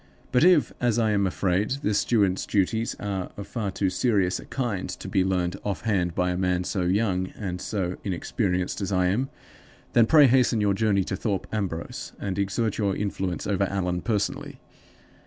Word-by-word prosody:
But 125 - +4
if 175 -4 +5
(as 120 -2 +2
I 110 -2 +2
am 100 -2 +2
afraid) 95 +2 0
the 105 - +1
steward's 100 -3 +1
duties 110 +3 0
are 95 -3 -3
of 100 - -6
far 110 -5 -3
too 95 0 -1
serious 95 -4 +1
a - - -10
kind 120 -8 -3
to - - -6
be 95 - +2
learned 90 -1 0
off 100 -3 -2
hand 90 -6 0
by 90 0 +1
a 90 - -2
man 90 -1 +1
so 95 +2 -2
young 95 -1 +1
and 90 -4 -4
so 90 -4 -2
inexperienced 90 0 -1
as 100 - -2
I 90 -1 +2
am, 125 +8 0 0.6
then 115 -2 +5
pray 150 0 +7
hasten 125 -3 +4
your 100 -1 +2
journey 100 -1 +2
to - - -3
Thorpe 100 -5 -2
Ambrose, 95 -6 -4
and 100 -1 -3
exert 100 +3 -1
your 100 -2 +1
influence 95 -3 -2
over 100 -1 +1
Allan 90 -2 -1
personally. 105 -4 -2
100 Hz, 185 wpm, -26 LUFS, 90-110 Hz, 0.6 s, pray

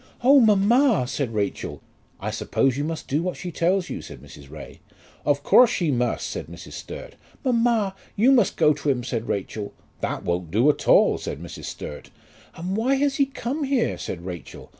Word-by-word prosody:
"Oh, 275 +3 +7
mamma!" 220 - +4
said 135 -2 -2
Rachel. 105 -2 -3 0.4
"I - - -3
suppose 135 -3 0
you 145 - -2
must 160 +1 -4
do 145 +4 0
what 180 +1 -3
she 180 - -6
tells 180 +3 +1
you," - - -5
said - - -10
Mrs. 70 -1 -14
Ray. 75 +1 -10 0.5
"Of 145 -1 +2
course 250 -2 +6
she 170 -9 0
must," 125 -1 0
said - - -5
Mrs. - - -11
Sturt. - - -8 0.3
"Mamma, 230 -5 +2 0.2
you 235 +6 +4
must 240 -7 +3
go 155 -2 +5
to 145 0 -3
him," 125 -3 +1
said 120 -2 -3
Rachel. 100 +1 -3 0.3
"That - - -3
won't 85 -1 -2
do 115 - +4
at - - -8
all," - - +5
said - - -5
Mrs. - - -8
Sturt. 75 - -7 0.5
"And 180 +4 -3
why 245 +6 +2
has 275 0 +1
he 275 - +3
come 275 +2 -4
here?" 270 -4 +1
said 85 -1 -6
Rachel. 90 -3 -8
170 Hz, 190 wpm, -24 LUFS, -, 0.5 s, Oh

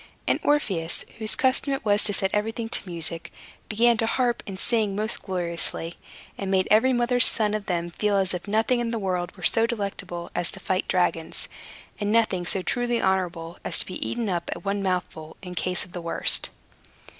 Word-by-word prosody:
And - - +1
Orpheus 190 - +1
(whose 220 -1 -1
custom 270 +2 +1
it 270 - -4
was 205 0 +3
to 205 - +4
set 190 -1 +1
everything 225 +2 -1
to 200 - -1
music) 165 -1 +1 0.4
began 235 +2 +4
to 225 - +1
harp 245 -1 +1
and 195 -2 -6
sing 220 -4 +1
most 215 +2 +2
gloriously, 170 -2 -3 0.4
and 195 - -3
made 190 -1 +2
every 225 +5 +5
mother's 245 0 +4
son 210 -2 +1
of 215 -1 -3
them 175 -1 -1
feel 205 +3 +1
as 190 -2 +1
if 180 +2 -5
nothing 220 +4 +2
in 240 -1 -1
this 230 -1 -2
world 185 -2 -2
were 180 - -12
so 225 +4 +3
delectable 200 -6 -4
as 175 -1 0
to - - -4
fight 185 0 -1
dragons, 170 -3 +1 0.5
and 205 -1 0
nothing 205 -6 +2
so 190 0 +1
truly 240 +1 +1
honorable 175 -3 -1
as - - 0
to - - +2
be 185 - -5
eaten 235 -2 -2
up 175 -3 -2
at 175 - -11
one 200 0 0
mouthful, 180 -4 -3
in 180 -1 -7
case 180 0 0
of 180 - -18
the 175 - -6
worst. 170 - +3
195 Hz, 200 wpm, -25 LUFS, 175-225 Hz, 0.5 s, every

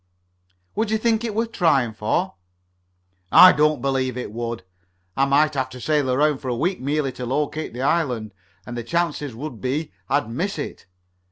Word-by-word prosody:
"Would 220 +1 -1
you 220 - +2
think 225 0 +1
it 225 -3 -3
worth 230 +1 -1
trying 140 - +2
for?" 110 - -1 1.0
"I 185 - +10
don't 150 -3 +2
believe 130 -2 0
I 125 - -3
would. 115 0 -5 0.5
I 135 - +3
might 150 +3 +3
have 130 -2 -1
to 130 - -10
sail 145 +1 +1
around 145 +2 +2
for 135 - -8
a 125 - 0
week 180 +8 -1
merely 140 0 0
to 125 - -6
locate 150 +2 -2
the 125 - -3
island, 125 - 0 0.3
and 120 - -7
the 120 - -3
chances 150 -2 -1
would 125 -2 -7
be 140 +3 -2 0.2
I'd 140 -4 +1
miss 165 - -3
it. 145 - -6
140 Hz, 180 wpm, -22 LUFS, 125-160 Hz, 1.0 s, I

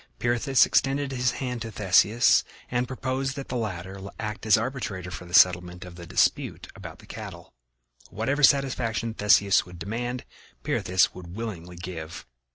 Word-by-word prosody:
Pirithous 120 +2 +3
extended 135 +4 +1
his 125 -1 0
hand 125 -3 -4
to 115 - -4
Theseus 105 +3 +4 0.3
and 125 0 0
proposed 130 +1 -3
that 140 -2 -7
the - - -3
latter 95 -4 -4 0.2
act 105 0 -5
as 110 - +6
arbitrator 110 -7 -4
for 90 - -7
the 85 - -13
settlement 90 -1 +4
of 90 - -10
the 85 -1 -11
dispute - - 0
about - - -10
the - - -16
cattle: - - -9 0.6
whatever 135 +8 -2
satisfaction 130 -5 +2
Theseus 100 -2 +4
would 90 -1 -11
demand 120 +7 -4 0.4
Pirithous 95 +1 +1
would 90 -1 -10
willingly 90 -6 -6
give. 85 -2 -7
110 Hz, 155 wpm, -26 LUFS, 90-125 Hz, 0.6 s, as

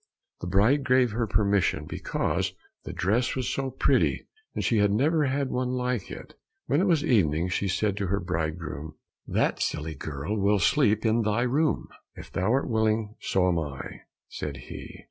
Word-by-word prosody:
The 85 - -5
bride 110 +10 +3
gave 130 -2 +3
her 115 +1 -1
permission 100 -2 +1
because - - -2 0.3
the - - -5
dress 115 +7 0
was 130 -1 -2
so 135 -1 -2
pretty, 130 - +1 0.3
and - - -1
she 115 - +2
had 105 0 +4
never 145 +9 +2
had 135 0 -1
one 125 0 -1
like 125 -4 -2
it. - - -9 0.3
When 145 +5 +2
it 195 - +2
was 165 -5 +3
evening 90 - +2
she 100 +2 -1
said 100 +2 0
to 100 - -1
her 100 +2 0
bridegroom, 80 -4 -4 0.3
"That - - 0
silly 80 +2 -2
girl 75 +8 -4
will 100 +1 +3
sleep 110 - +2
in 115 +1 +3
thy 110 +2 +1
room." 145 +6 +1 0.3
"If - - -11
thou 95 +4 0
art 135 +2 +1
willing 110 -2 +1
so 95 -1 +1
am 85 -2 +2
I," 70 -4 -6 0.3
said - - -5
he. - - -8
105 Hz, 180 wpm, -27 LUFS, 90-125 Hz, 0.3 s, had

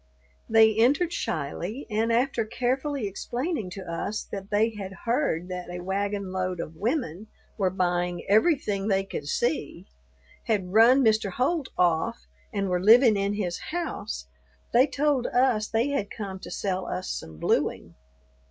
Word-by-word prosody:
They 220 -1 +6
entered 285 +10 +3
shyly, 175 - -3
and 225 +1 0
after 240 0 +1
carefully 255 +3 -1
explaining 240 - -3
to 195 - -7
us 180 +5 -3
that 195 0 -6
they 215 +2 +2
had 195 -3 -7
heard 230 - 0
that 180 -1 -5
a 175 0 -6
wagon 200 +1 -2
load 185 -1 -2
of 160 -1 -5
women 215 - -2 0.3
were 195 -3 +1
buying 175 -1 -1
everything 210 - +2
they 195 -2 +2
could 150 -6 -6
see, - - -1 0.6
had 195 -5 -1
run 240 +4 +6
Mr. 215 -3 +2
Holt 275 - 0
off, 180 +6 +1 0.3
and 200 -2 -1
were 180 -1 0
living 225 +3 +7
in 200 +1 0
his 180 -4 -2
house, 305 - -4 0.5
they 255 +4 +6
told 280 -3 +1
us 245 -4 +2
they 230 +5 +1
had 280 -8 -1
come 195 -3 -6
to - - -9
sell 190 -2 -2
us 185 - -4
some 80 -1 -6
blueing. - - 0
210 Hz, 150 wpm, -26 LUFS, 185-245 Hz, 0.6 s, living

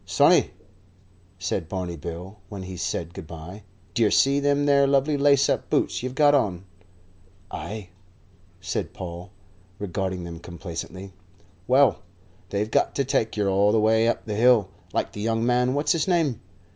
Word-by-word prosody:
"Sonny," - - +4 0.9
said 85 -1 -3
Barney 90 -2 -3
Bill, 85 +6 -8
when 100 -2 -7
he 95 0 -7
said 85 -1 -3
good 80 - -9
bye, 85 +5 -9 0.3
"d'yer 115 -3 +3
see 140 +5 +3
them 145 0 +1
there 140 -1 +4
lovely 140 +2 +2
lace 140 -1 +4
up - - -1
boots - - 0
you've 130 +1 -5
got 145 0 +5
on?" 100 -10 +1 0.9
"Ay," 105 -3 -6 0.7
said 95 +1 -4
Paul, 90 0 -7 0.5
regarding 95 -2 -3
them 85 -1 -7
complacently. 85 +3 -8 0.5
"Well, 135 +2 +4 0.5
they've 105 +2 -2
got - - +1
to 140 - 0
take 120 -5 0
yer 105 -1 +1
all 100 +2 +3
the 110 - +3
way 110 +1 +3
up 115 - -1
the 110 - -4
hill, 115 -1 +4 0.2
like - - -1
the 105 - -7
young 115 +1 0
man 125 +1 +2
what's 145 +2 +1
his 165 0 +1
name? 165 - +1
105 Hz, 160 wpm, -25 LUFS, 90-135 Hz, 0.9 s, got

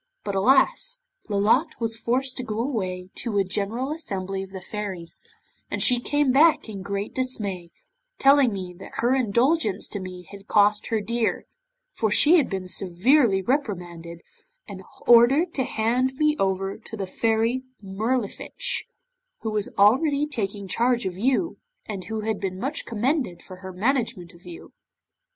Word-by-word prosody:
But 200 - -3
alas! 265 - +3 0.3
Lolotte 215 +10 +2
was 225 -1 -1
forced 255 +3 -1
to 255 - -1
go 215 -2 -4
away 190 -8 -3
to 225 -4 -2
a 200 - +4
general 215 +8 -2
assembly 195 - -3
of 190 - -8
the 190 0 -7
Fairies, 190 -3 -5 0.5
and - - -3
she 245 -2 +4
came 290 +2 +1
back 300 +2 +4
in 205 -3 -7
great 200 +1 -4
dismay, 205 -9 -2 0.5
telling 275 -2 +5
me 185 -3 -5
that - - -11
her 240 +2 +2
indulgence 245 - +2
to 205 - -4
me 180 -2 -8
had 200 0 -12
cost 210 0 +3
her 225 -2 0
dear, 235 +2 -1 0.5
for 220 - 0
she 305 +11 +6
had 295 - +2
been 190 -2 -3
severely 195 - +2
reprimanded 175 - -3 0.5
and - - -8 0.2
ordered 260 +9 +5
to 265 - 0
hand 245 +4 0
me 300 +2 +2
over 195 +1 -1
to 220 0 -9
the 195 - -3
Fairy 225 +5 0 0.2
Mirlifiche, 220 - -2 0.6
who 220 - -3
was 210 -1 -1
already 280 +8 +4
taking 200 -8 -4
charge 240 +5 +1
of 185 -2 -3
you, 265 - 0 0.3
and 195 -4 -6
who 220 +1 -4
had 220 -1 -2
been 185 -2 -3
much 275 +6 -3
commended 235 - -1
for 185 - -11
her 190 0 -8
management 220 -3 -1
of 170 +1 -17
you. 170 -2 -11
220 Hz, 160 wpm, -24 LUFS, 195-255 Hz, 0.6 s, she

